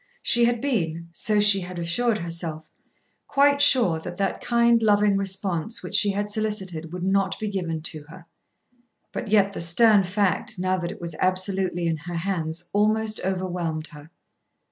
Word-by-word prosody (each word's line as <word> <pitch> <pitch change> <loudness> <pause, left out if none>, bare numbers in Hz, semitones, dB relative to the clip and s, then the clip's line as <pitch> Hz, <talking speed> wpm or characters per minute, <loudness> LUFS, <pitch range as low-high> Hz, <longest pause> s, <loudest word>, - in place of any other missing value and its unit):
She 240 0 +4
had 240 -1 0
been, 170 - -2
so 210 +4 0
she 205 -1 +7
had 180 -1 -7
assured 210 +7 +1
herself, 165 -3 -5 0.6
quite 285 0 +3
sure 245 - +5
that 175 +2 -8
that 195 -1 -2
kind, 235 -1 +3
loving 205 -2 +3
response 195 +1 -2
which - - -8
she 205 - +4
had 205 +1 -2
solicited, 190 -7 -4
would 180 0 -6
not 195 0 +1
be 215 - -3
given 170 -6 -3
to 155 -2 -5
her. 175 +1 -13 0.9
But - - -5
yet 200 -1 +3
the - - -5
stern 205 +5 +4
fact, 190 0 -1
now 185 +1 0
that 175 0 -4
it - - -10
was 170 -1 -5
absolutely 185 -1 -1
in 165 -1 0
her 175 +3 -7
hands, 170 -2 -3
almost 215 +1 +1
overwhelmed 180 -4 -3
her. 150 0 -13
190 Hz, 165 wpm, -24 LUFS, 170-210 Hz, 0.9 s, she